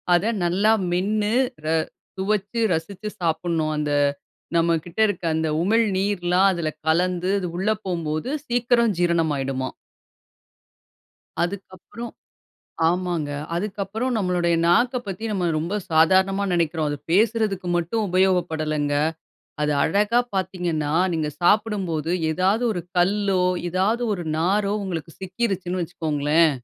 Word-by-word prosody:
அத 175 - +1 0.2
நல்லா 195 +5 +3 0.2
மென்னு, 210 +4 0 0.3
ர - - -3 0.5
சுவச்சு, 205 +3 -1
ரசிச்சு 195 +6 -5
சாப்ட்னும். 160 -1 0
அந்த 150 -1 -1 0.6
நம்மகிட்ட 170 +3 0
இருக்க 205 -3 -3
அந்த 160 0 0 0.2
உமிழ் 225 +4 +3
நீர்லாம் 190 -1 +2
அதுல 170 -3 -2 0.2
கலந்து 180 +2 +1
அது 180 - -3
உள்ள 195 +3 0 0.2
போம்போது 170 +3 -2 0.2
சீக்கிரம் 240 -1 +2
ஜீரணம் 170 -3 +2
ஆயிடுமாம். 135 -1 -3 1.7
அதுக்கப்புறம் 195 +5 -6 0.8
ஆமாங்க. 175 -4 -1 0.2
அதுக்கப்புறம் 210 +6 -2
நம்முடைய 180 -4 +1
நாக்கப் 245 +8 +2
பத்தி 195 +3 -5
நாம 185 -4 0
ரொம்ப 170 +6 -2 0.2
சாதாரணமா 190 +5 +4
நெனைக்கிறோம். 165 -2 0
அது 145 - -2
பேசுறதுக்கு 210 -2 +1
மட்டும் 190 +6 -1
உபயோகப்படலங்க. 160 -5 +1 0.7
அது 150 0 +1
அழகா 210 +4 +2 0.2
பார்த்தீங்கன்னா, 175 -5 -1 0.2
நீங்க 155 -2 -1
சாப்பிடும்போது 175 -5 +1 0.2
ஏதாவது 190 +8 +1
ஒரு 175 -4 -3 0.2
கல்லோ, 195 +1 +2 0.3
ஏதாவது 200 +7 +1
ஒரு 175 - -6
நாரோ, 200 +4 +1
உங்களுக்கு 165 -4 -5
சிக்கிருச்சுன்னு 185 -2 -2
வச்சுக்கோங்களேன், 160 -1 +2
180 Hz, 110 wpm, -23 LUFS, 165-205 Hz, 1.7 s, சாதாரணமா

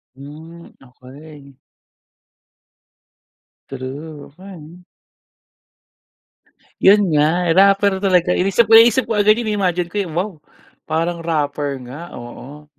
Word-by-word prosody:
Hmm, 160 +5 -13 0.2
okey. 140 +3 -16 2.2
True. 140 +3 -8
Okey. 180 -1 -14 2.0
Yun 200 +2 +6
nga, 165 +3 +1
rapper 195 0 +4
talaga. 180 -2 +2
Inisip 195 +5 +1
ko 225 - +4
naisip 230 +3 +6
ko 225 - -3
agad 210 +2 +3
yun 240 - -4
na-imagine 180 -3 -1
ko, - - -15
wow! 180 +6 -3 0.6
Parang 165 +2 -2
rapper 145 -3 -3
nga, 150 +8 -10
oo. 135 +5 -12
165 Hz, 100 wpm, -18 LUFS, 145-195 Hz, 2.2 s, Yun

